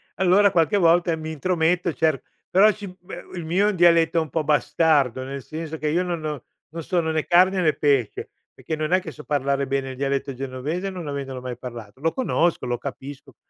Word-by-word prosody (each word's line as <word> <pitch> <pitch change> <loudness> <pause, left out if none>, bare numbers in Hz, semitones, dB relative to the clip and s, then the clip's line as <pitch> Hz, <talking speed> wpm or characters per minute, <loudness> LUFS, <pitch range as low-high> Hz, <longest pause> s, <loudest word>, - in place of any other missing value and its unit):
allora 190 +2 +4
qualche 170 +1 +2
volta 170 -1 +4
e - - +1
mi 160 0 -6
intrometto 170 +1 0
cer 155 -4 +1 0.3
però 205 +3 +6
sì, 205 -1 -8
beh, 175 0 -10
il 170 -2 -5
mio 185 +6 +2
è - - +3
un - - -5
dialetto 170 -1 +4
un 160 - -5
po' 160 +1 -1
bastardo, 145 -3 +2
nel 135 0 -6
senso 160 0 -6
che 155 -1 -2
io 170 +4 +1
non 175 -3 -4
ho 150 -5 -4 0.3
non 165 +1 -7
sono 165 -2 0
né 155 -1 -1
carne 185 +2 +4
né 155 -3 +4
pesce, 140 -7 0 0.2
perché 160 - -5
non 155 +1 -3
è 185 - +4
che 170 -4 -8
so 150 - -12
parlare 140 -1 0
bene 135 0 -2
il 130 - -8
dialetto 140 0 -1
genovese 135 +8 -4
non 180 -5 -7
avendolo 135 -2 -5
mai 125 -1 -6
parlato; 120 -2 -9
lo 165 +1 +1
conosco, 175 - 0
lo 120 -1 -1
capisco. 140 0 -8
160 Hz, 215 wpm, -23 LUFS, 140-175 Hz, 0.3 s, però